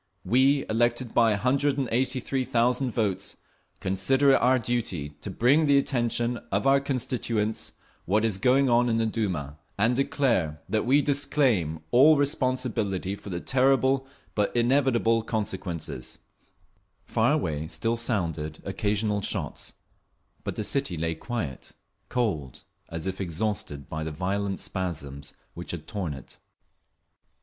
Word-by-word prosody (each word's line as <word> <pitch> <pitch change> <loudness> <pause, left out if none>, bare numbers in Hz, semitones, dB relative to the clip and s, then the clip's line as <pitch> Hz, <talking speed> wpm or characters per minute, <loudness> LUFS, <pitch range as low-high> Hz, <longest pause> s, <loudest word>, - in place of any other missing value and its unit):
We, 135 +3 +3
elected 120 +2 +1
by 115 -1 +5
183,000 130 0 +1
votes, 100 -4 -2 0.4
consider 135 +10 +3
it - - +4
our 130 +2 +4
duty 115 - -2
to - - -4
bring 125 +9 +3
to 160 - +2
the 140 -1 +5
attention 120 -3 0
of - - 0
our 135 0 +5
constituents 120 -5 -2 0.3
what 105 +4 +2
is 105 -4 0
going 130 +5 +4
on 120 0 +3
in 115 - +1
the 115 - +1
Duma, 90 -10 -2 0.2
and 115 +4 +3
declare 120 - +1
that 110 +1 0
we 140 +3 +4
disclaim 135 - +1
all 145 +5 +7
responsibility 125 - 0
for 100 - -10
the 85 -2 -3
terrible 135 +2 +2 0.3
but 105 +2 0
inevitable 120 -2 +3
consequences…. 95 - -4 0.9
Far - - +2
away 75 0 -1
still 80 +10 -1
sounded 85 - -2
occasional 105 +1 0
shots, - - -3 0.7
but - - -4
the - - -2
city 135 -6 -1
lay 80 +1 -1
quiet, 80 - -5 0.4
cold, 95 - -2 0.3
as 80 0 -5
if 95 0 -3
exhausted 85 -5 -3
by 80 0 -4
the 80 - -4
violent 95 +4 -2
spasms 70 -6 -5 0.2
which 85 - -8
had 80 -3 -5
torn 90 -7 -4
it. 65 - -12
115 Hz, 130 wpm, -27 LUFS, 95-130 Hz, 0.9 s, all